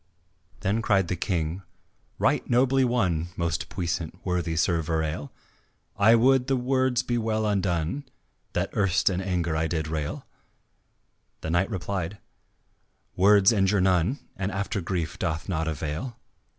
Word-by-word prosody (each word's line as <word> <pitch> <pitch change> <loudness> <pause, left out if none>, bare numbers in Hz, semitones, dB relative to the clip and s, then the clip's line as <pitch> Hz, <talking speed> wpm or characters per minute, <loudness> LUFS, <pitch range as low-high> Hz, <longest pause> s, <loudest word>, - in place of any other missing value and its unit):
Then 105 +3 +1
cried 95 -5 +2
the 90 - 0
King: 85 0 -2 0.6
"Right - - +1
nobly 130 +2 +3
won, 95 -10 +1
Most 85 -2 -1
puissant, 85 -2 -3
worthy 90 -3 -1
Sir 85 +1 +2
Verale, 80 -2 -2 0.6
I 110 +3 +6
would 130 +2 +4
the 135 - +2
words 130 -1 +1
were 120 -1 0
well 110 -1 0
undone 95 - 0 0.5
That - - -1
erst 95 -1 +2
in 90 0 -1
anger 90 -4 -1
I 80 +1 +1
did 80 -2 -2
rail." 75 -1 -4 1.2
The 80 - -3
knight 85 +5 +2
replied, 95 -1 -3 1.0
"Words 100 +1 +6
injure 100 -2 +2
none, 95 - +2 0.2
And 95 +1 -2
after 100 +1 -2
grief 85 -2 -3
doth 80 0 -2
not 80 -4 -1
avail. 80 - -4
95 Hz, 135 wpm, -26 LUFS, 85-110 Hz, 1.2 s, I